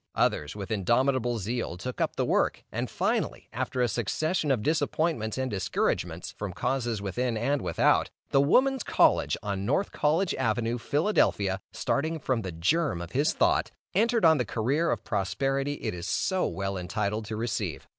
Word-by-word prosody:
Others, 75 +4 +1
with 100 +1 -6
indomitable 120 +4 +1
zeal, 110 -3 -3
took 125 +7 -5
up - - 0
the - - 0
work, - - +1
and - - -3
finally, - - -1
after 125 - -1
a - - +3
succession 150 - -1
of 125 -6 +1
disappointments 155 -6 0
and 130 -1 -1
discouragements 95 -3 -1
from 100 -3 -6
causes 120 -1 -1
within 120 +4 -1
and 135 +6 0
without, - - +2 0.2
the 135 - +5
Woman's 260 - +3
College, - - +3
on 100 -2 -2
North 150 - 0
College 165 +5 +1
avenue, 115 +2 0
Philadelphia, 115 - +1
starting 140 +9 -1
from 130 -5 -1
the 95 -3 -5
germ 95 - +1
of 85 - -7
his 145 +4 +2
thought, - - +2 0.2
entered 230 +1 +3
on 160 -3 +6
the - - +2
career 130 +9 0
of 115 -1 -1
prosperity 135 +8 -1
it 145 - -4
is 85 0 -6
so 190 - +1
well 95 0 -3
entitled 100 +4 -2
to 110 +1 -5
receive. 105 - -3
120 Hz, 165 wpm, -28 LUFS, 100-145 Hz, 0.2 s, on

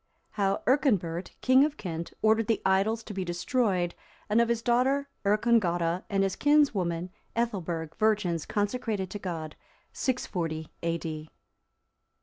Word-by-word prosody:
How 195 -1 0
Earconbert, 205 - +1
King 260 +1 +6
of 295 0 0
Kent, 170 -3 -5
ordered 220 0 +4
the 225 - +2
idols 200 +4 +2
to 215 - -8
be 190 -1 -2
destroyed; 180 0 0 0.4
and 225 +2 +5
of 235 - +1
his 235 -1 0
daughter 265 +4 +2
Earcongota, 200 -5 +2
and 195 -2 +2
his 195 -1 0
kinswoman 190 - +2 0.2
Ethelberg, 175 -9 -2
virgins 205 -7 +1
consecrated 205 -2 -1
to 205 - -5
God. 165 -5 -5 0.4
[640 165 - -2
A.D. 165 -2 -3
200 Hz, 130 wpm, -28 LUFS, 170-235 Hz, 0.4 s, King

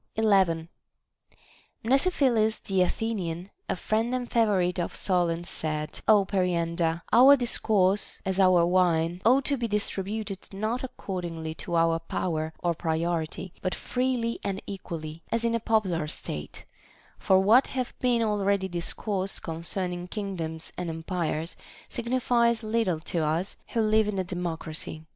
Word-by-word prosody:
11. 190 -7 +3 1.2
Mnesiphilus 255 -5 +3
the 190 -2 +1
Athenian, 180 -2 -2 0.2
a - - +1
friend 225 +6 0
and 245 -1 -4
favorite 190 -6 +2
of 175 - -3
Solon's, 175 -2 0
said: 155 -1 -3
Ο 210 -3 +6
Periander, 170 -3 0
our 260 +5 +9
discourse, 205 -5 +2
as 190 0 -1
our 185 -3 +5
wine, 175 -1 +2
ought 260 +4 +4
to 280 - +1
be 240 -2 -1
distributed 205 -1 -3
not 215 +6 -2
according 175 -9 -5
to 170 +1 -5
our 165 0 +3
power 160 -1 -2
or 175 -1 +2
pri 160 0 -1
oritv, 170 +1 -2
but 185 - -1
freely 250 -2 -1
and 195 -1 -2
equally, 165 -5 -6
as 230 0 0
in 230 - +1
a 230 - +1
popular 190 -8 +1
state; 75 - -6 0.5
for 190 - +4
what 220 +7 +5
hath 255 -2 -3
been 245 -2 +2
already 200 -2 +1
discoursed 190 +2 -2
concerning 175 +2 -3
kingdoms 175 -6 -4
and 180 -1 -3
empires 165 -1 -3 0.3
signifies 235 -1 +1
little 215 -6 0
to 170 +1 -3
us 160 +4 -1
who 230 - 0
live 215 0 +3
in 210 -2 -2
a 190 - +1
democracy. 165 -3 -5
190 Hz, 140 wpm, -27 LUFS, 170-220 Hz, 1.2 s, our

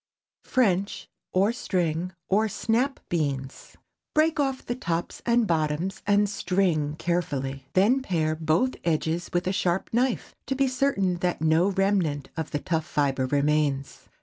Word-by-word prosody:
FRENCH, 200 -6 +1 0.2
OR 195 +4 +3
STRING 180 -6 -1 0.2
OR 215 +3 +3
"SNAP" 240 +7 0
BEANS. 140 -5 -3 0.4
Break 310 +1 +3
off 270 -2 0
the 240 - -1
tops 170 -8 -3
and 235 -1 +4
bottoms 160 +1 -1
and 205 0 +4
"string" 175 -6 0
carefully. 140 -6 -2
Then 220 +8 +4
pare 160 -9 0
both 160 +11 +1
edges 165 +1 0
with 175 0 0
a 185 - 0
sharp 180 -1 0
knife, 250 +1 0
to 270 - -1
be 270 0 +2
certain 250 -9 +1
that 175 -1 -1
no 160 +3 +3
remnant 190 -8 0
of 160 -3 -3
the - - -1
tough 160 +1 -2
fibre 135 -3 0
remains. 145 0 0
175 Hz, 145 wpm, -26 LUFS, 155-210 Hz, 0.4 s, and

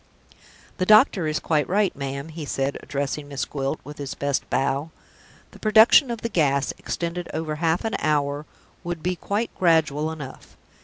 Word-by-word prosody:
"The 185 - 0
doctor 215 - +5
is 155 0 0
quite 150 -3 0
right, 200 0 +2
ma'am," 140 +1 -5
he 160 0 -7
said, 135 -1 -2
addressing 145 +1 -3
Miss 140 -1 -3
Gwilt, 135 +1 -3
with 145 +2 -10
his 140 -2 -5
best 140 -1 -2
bow; 140 +3 0 0.6
"the - - -15
production 220 +4 +6
of 235 -2 -4
the - - -1
gas, 140 -7 +1
extended 170 0 -4
over 155 -1 -3
half 165 +4 0
an 225 - -1
hour, 145 0 0 0.4
would 175 -2 -5
be 180 +1 0
quite 205 +6 -2
gradual 160 -3 +2
enough. 145 -4 -10
155 Hz, 165 wpm, -24 LUFS, 140-180 Hz, 0.6 s, production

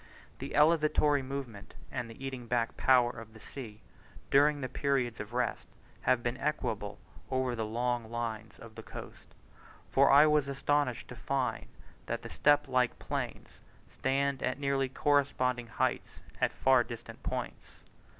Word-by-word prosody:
The 135 - -5
elevatory 150 -2 +4
movement, 130 -6 -7 0.2
and 120 - -4
the 115 +4 -9
eating 130 -3 -5
back 115 -1 0
power 125 -2 +4
of 115 -2 -11
the - - -12
sea 110 -4 -9 0.5
during 145 +1 +5
the 130 - -2
periods 130 -3 0
of 105 +1 -6
rest, 120 -1 -1 0.3
have 120 -2 +2
been 120 +1 -1
equable 105 -8 -2 0.3
over 130 -2 0
long 115 +1 -1
lines 110 -2 -4
of 115 -1 -12
coast; - - -11 0.6
for 140 +1 +5
I 145 +2 +8
was 150 -2 +3
astonished 140 -2 0
to - - -8
find - - -2 0.4
that - - -3
the - - -8
step 145 0 +3
like 125 -2 +1
plains - - -5 0.3
stand 135 0 0
at 130 - -1
nearly 140 -1 +1
corresponding 130 -3 +1
heights 115 - -2 0.2
at - - +3
far 130 -2 +4
distant 120 -1 -9
points. - - -5
130 Hz, 145 wpm, -31 LUFS, 120-140 Hz, 0.6 s, I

